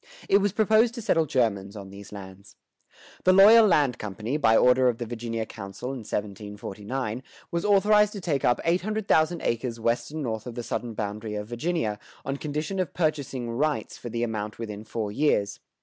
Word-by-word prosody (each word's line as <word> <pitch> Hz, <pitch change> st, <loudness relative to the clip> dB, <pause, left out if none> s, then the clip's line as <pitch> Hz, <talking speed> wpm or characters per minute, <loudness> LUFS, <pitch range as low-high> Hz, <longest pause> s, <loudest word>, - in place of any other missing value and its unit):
It 200 Hz, -, +5 dB
was 200 Hz, 0 st, +1 dB
proposed 220 Hz, +3 st, +3 dB
to 235 Hz, -, -5 dB
settle 165 Hz, -5 st, +2 dB
Germans 110 Hz, -7 st, 0 dB
on 100 Hz, -2 st, -9 dB
these 100 Hz, 0 st, -11 dB
lands. 100 Hz, -1 st, -11 dB, 0.7 s
The 185 Hz, -, +5 dB
Loyal 215 Hz, +4 st, +8 dB
Land 145 Hz, -, +2 dB
Company, 105 Hz, +5 st, -4 dB
by 115 Hz, -7 st, +4 dB
order 125 Hz, 0 st, +5 dB
of 120 Hz, -, -2 dB
the 120 Hz, -, -4 dB
Virginia 115 Hz, -1 st, -4 dB
council 100 Hz, +5 st, -7 dB
(1749), 105 Hz, +1 st, -5 dB, 0.3 s
was 170 Hz, 0 st, -1 dB
authorized 210 Hz, +1 st, +4 dB
to 205 Hz, -, -5 dB
take 155 Hz, -7 st, -1 dB
up 120 Hz, -, +3 dB
eight 170 Hz, +2 st, +2 dB
hundred 215 Hz, +1 st, -3 dB
thousand 160 Hz, +2 st, +2 dB
acres 115 Hz, 0 st, -2 dB
west 115 Hz, +1 st, 0 dB
and 155 Hz, 0 st, -5 dB
north 110 Hz, -2 st, -3 dB
of 120 Hz, -, -7 dB
the 120 Hz, -, -4 dB
southern 115 Hz, -1 st, -4 dB
boundary 105 Hz, +1 st, -4 dB
of 105 Hz, 0 st, -4 dB
Virginia, 120 Hz, -4 st, -2 dB, 0.3 s
on 135 Hz, +1 st, -2 dB
condition 155 Hz, +6 st, -3 dB
of 185 Hz, -4 st, -2 dB
purchasing 145 Hz, -7 st, -1 dB
"rights" 140 Hz, -1 st, -1 dB
for 120 Hz, -, -7 dB
the 115 Hz, +1 st, -2 dB
amount 105 Hz, -2 st, -3 dB
within 105 Hz, -2 st, -6 dB
four 110 Hz, -2 st, -3 dB
years. 105 Hz, -6 st, +1 dB
120 Hz, 185 wpm, -26 LUFS, 105-165 Hz, 0.7 s, Loyal